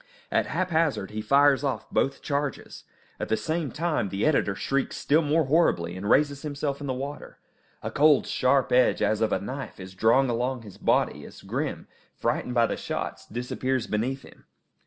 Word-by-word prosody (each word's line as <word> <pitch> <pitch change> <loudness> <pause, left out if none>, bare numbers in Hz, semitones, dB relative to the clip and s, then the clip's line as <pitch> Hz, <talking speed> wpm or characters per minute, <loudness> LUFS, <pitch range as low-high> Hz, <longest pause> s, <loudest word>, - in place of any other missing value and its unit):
At - - +2
haphazard 165 - 0
he 110 0 -4
fires 140 +4 +4
off 130 -6 -2
both 135 - 0
charges. 145 -1 -3 0.3
At - - -4
the 110 - +2
same 155 +5 -2
time 160 - -1
the 100 +2 -1
editor 135 -10 +2
shrieks 135 +6 -1
still 155 +3 +3
more 155 +1 +2
horribly, 110 - +2
and 100 +3 -4
raises 140 +1 +3
himself 145 -1 -3
in 145 - -4
the 130 - -1
water. 140 +3 -7 0.5
A - - -3
cold, 150 0 +4
sharp 130 +1 +2
edge, 125 -3 +4
as 105 +1 +1
of 110 -2 +2
a - - +2
knife, 130 +4 -6
is 95 0 -9
drawn 115 +7 +3
along 125 +1 -1
his 105 -4 -12
body, - - +1
as - - -12
Grim, - - -3 0.3
frightened 125 - -1
by 120 -1 +5
the - - -2
shots, - - -5
disappears 125 +1 -2
beneath 125 +6 -2
him. - - -17
135 Hz, 180 wpm, -26 LUFS, 110-145 Hz, 0.5 s, by